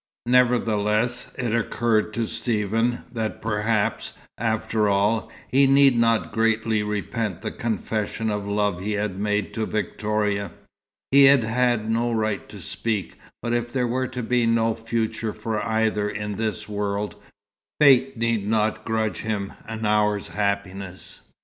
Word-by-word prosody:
Nevertheless, 120 -1 +2
it 120 -3 -1
occurred 115 -1 +1
to 115 -1 0
Stephen 115 +2 -1
that 110 -2 -3
perhaps, 110 -1 -1 0.2
after 110 -1 0
all, 100 +2 +1 0.2
he 135 +1 +4
need 135 -1 +6
not 115 -1 +2
greatly 110 -1 +1
repent 105 -1 -3
the - - -3
confession 110 -1 -2
of 105 -1 -3
love 100 -3 0
he 105 +2 -2
had 105 -2 -2
made 105 0 -1
to 110 -1 -2
Victoria. 105 -3 -1 0.6
He 140 0 +8
had 135 -3 +6
had 120 -1 +1
no 115 +2 +1
right 110 -3 -1
to - - -10
speak, 110 -4 -3 0.2
but 120 0 -1
if 120 0 -1
there 125 -1 0
were 130 +2 -1
to 125 -1 -5
be 120 0 +2
no 115 0 +2
future 115 -1 -2
for 110 0 -3
either 110 -2 +1
in 105 0 -4
this 110 -1 -2
world, 105 0 -2 0.6
fate 135 -3 +5
need 115 -3 0
not 110 0 +1
grudge 110 -4 -1
him 105 -3 -3
an 110 0 -4
hour's 105 -1 +1
happiness. 100 -2 -3
110 Hz, 145 wpm, -24 LUFS, 105-115 Hz, 0.6 s, He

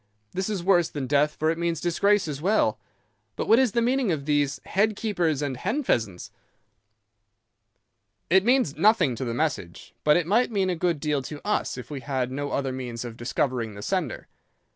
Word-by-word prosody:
'This 190 +2 -2
is 200 -5 -2
worse 175 -3 +3
than 145 -3 -4
death, 145 +3 +2
for 155 +1 +1
it 165 - -4
means 170 -2 -1
disgrace 190 +3 +2
as 145 -2 -5
well. 205 +6 +2 0.6
But - - -3
what 225 - +6
is 255 -6 +2
the 235 - +2
meaning 250 -3 +1
of 145 -4 -2
these 145 -2 +1
"head 210 +3 +1
keepers" 175 - 0
and 140 -2 -2
"hen 220 - -1
pheasants"?' 110 - -1 2.0
"'It 190 +3 +4
means 245 - +2
nothing 180 - +4
to 130 - -4
the 115 -1 -3
message, 130 - -3
but 150 +1 +5
it 175 - 0
might 220 +8 +2
mean 195 -4 0
a - - -1
good 170 -2 0
deal 150 -2 0
to 145 +2 -7
us 210 - 0
if 125 +2 -9
we 145 - -4
had 130 -2 -2
no 145 +2 -3
other 135 -1 -1
means 125 -2 -5
of 115 -2 -7
discovering 120 -2 -2
the 100 - -8
sender. 180 - -2
155 Hz, 195 wpm, -25 LUFS, 135-195 Hz, 2.0 s, what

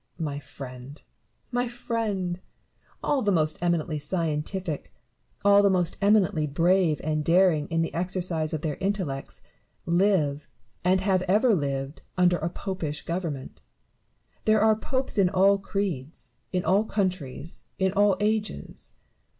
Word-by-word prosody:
Barrow. 165 - -2
My 140 - -4
friend! 135 0 -10 0.5
my 245 0 0
friend! 220 -7 -2 0.6
all 285 -2 +1
the 205 - +2
most 155 -4 +1
eminently 170 -3 0
scientific, 160 +1 -2 0.5
all 200 0 +7
the 200 - +4
most 180 -3 +2
eminently 195 -7 +3
brave 165 +2 +2
and 155 0 0
daring 165 -3 +3
in 165 0 0
the 165 - -4
exercise 175 -3 -1
of 155 -3 -3
their 150 -3 -2
intellects, 190 -9 -3 0.4
live, 170 -5 +2 0.4
and 185 +1 +3
have 190 -1 +2
ever 215 +6 +4
lived, 140 -3 -2 0.2
under 180 -1 +4
a 165 - -1
popish 165 -6 -4
government. 165 -6 -4 0.8
There 215 -1 +4
are 220 0 +5
popes 260 +1 -2
in 185 -2 +5
all 195 +1 +4
creeds, 185 -8 -3 0.2
in 180 -1 -1
all 195 +5 +4
countries, 185 -8 -3
in 190 -1 +1
all 205 -2 +3
ages. 215 0 -2
180 Hz, 135 wpm, -26 LUFS, 155-200 Hz, 0.8 s, all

